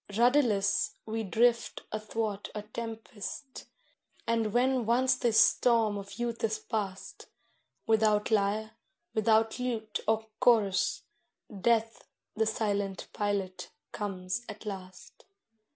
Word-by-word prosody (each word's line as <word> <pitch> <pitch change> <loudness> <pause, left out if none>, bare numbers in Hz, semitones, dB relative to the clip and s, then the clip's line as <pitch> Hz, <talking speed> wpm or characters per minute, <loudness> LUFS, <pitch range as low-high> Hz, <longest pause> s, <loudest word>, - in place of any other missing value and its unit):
Rudderless, 230 -6 +3
we 225 +1 -2
drift 230 +3 +1
athwart 215 -1 -3
a 210 - -4
tempest, 225 +4 -7 0.6
and 230 -2 +1
when 250 0 +2
once 255 +2 +4
the 250 -2 +1
storm 220 0 +4
of 200 0 -7
youth 240 -1 -3
is 220 -1 +1
past, 200 -4 -5 0.6
Without 215 -1 +3
lyre, 215 +1 +1 0.4
without 220 +1 +2
lute 225 -4 -2
or 220 0 +2
chorus, 200 -6 +3 0.5
Death 225 +2 +1 0.3
the 220 0 +1
silent 205 -3 -1
pilot 200 -3 -2 0.2
comes 190 +1 -3
at 215 +1 -9
last. 185 -3 -9
220 Hz, 105 wpm, -30 LUFS, 205-230 Hz, 0.6 s, once